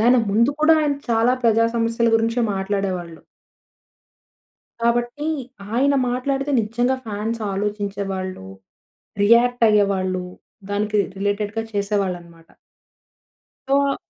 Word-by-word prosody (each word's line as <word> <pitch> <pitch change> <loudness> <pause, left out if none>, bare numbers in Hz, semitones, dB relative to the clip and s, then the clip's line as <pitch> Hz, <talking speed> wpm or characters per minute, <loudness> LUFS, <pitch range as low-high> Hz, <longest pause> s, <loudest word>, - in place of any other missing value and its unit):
దాని 245 +3 +5
ముందు 230 +6 +3
కూడా 315 +1 +6
ఆయన 290 -1 +1 0.2
చాలా 230 +2 +3
ప్రజా 230 0 +4
సమస్యల 230 0 +1
గురించే 230 +2 0
మాట్లాడేవాళ్ళు. 190 -4 -3 1.6
కాబట్టి, 240 +5 0 0.5
ఆయన 280 +3 +3
మాట్లాడితే 270 +3 -1
నిజంగా 240 +4 0
ఫాన్స్ 220 +2 -3
ఆలోచించేవాళ్ళు, 195 - -3 0.8
రియాక్ట్ 235 +2 +4
అయ్యేవాళ్ళు, 190 -3 +1 0.5
దానికి 210 +1 -1
రి - - -6
రిలేటెడ్‌గా 205 +2 -1
చేసేవాళ్ళనమాట. 185 -5 -3 1.2
సో 275 0 +2
215 Hz, 95 wpm, -21 LUFS, 200-240 Hz, 1.6 s, కూడా